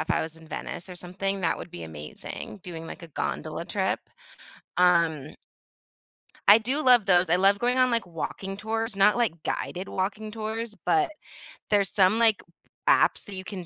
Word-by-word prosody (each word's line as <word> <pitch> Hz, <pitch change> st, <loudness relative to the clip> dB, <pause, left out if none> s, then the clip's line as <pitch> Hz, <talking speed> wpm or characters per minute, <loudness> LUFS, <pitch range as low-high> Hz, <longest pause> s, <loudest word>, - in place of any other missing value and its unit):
if -, -, -4 dB
I -, -, +2 dB
was 160 Hz, 0 st, -7 dB
in 160 Hz, -1 st, -16 dB
Venice 170 Hz, -, -6 dB
or 180 Hz, -, -8 dB
something, 195 Hz, +2 st, -3 dB
that 165 Hz, -, +1 dB
would 170 Hz, -, -9 dB
be 85 Hz, -, -8 dB
amazing, 80 Hz, -, -8 dB
doing, 165 Hz, -2 st, -7 dB
like, -, -, -9 dB
a 170 Hz, -, -9 dB
gondola 155 Hz, -, -4 dB
trip. -, -, -1 dB, 0.8 s
Um 170 Hz, -5 st, +3 dB, 1.2 s
I 205 Hz, +2 st, +10 dB
do 260 Hz, +7 st, -1 dB
love 245 Hz, -5 st, +6 dB
those. 180 Hz, -2 st, +4 dB
I 175 Hz, -, +5 dB
love 195 Hz, +2 st, +4 dB
going 245 Hz, +3 st, +1 dB
on, 255 Hz, 0 st, +4 dB
like, 230 Hz, -4 st, 0 dB
walking 190 Hz, +3 st, -5 dB
tours, 220 Hz, +1 st, -3 dB
not, 200 Hz, +3 st, +5 dB
like, 210 Hz, -10 st, 0 dB
guided 185 Hz, +2 st, -3 dB
walking 210 Hz, +3 st, -3 dB
tours, 220 Hz, +1 st, -4 dB
but 385 Hz, -4 st, +2 dB, 0.6 s
there's 200 Hz, -3 st, +3 dB
some, 195 Hz, +2 st, +3 dB
like, 225 Hz, -2 st, +4 dB, 0.5 s
apps -, -, +4 dB
that 200 Hz, -, -8 dB
you 185 Hz, -, -6 dB
can 185 Hz, -2 st, -7 dB
195 Hz, 180 wpm, -26 LUFS, 175-220 Hz, 1.2 s, I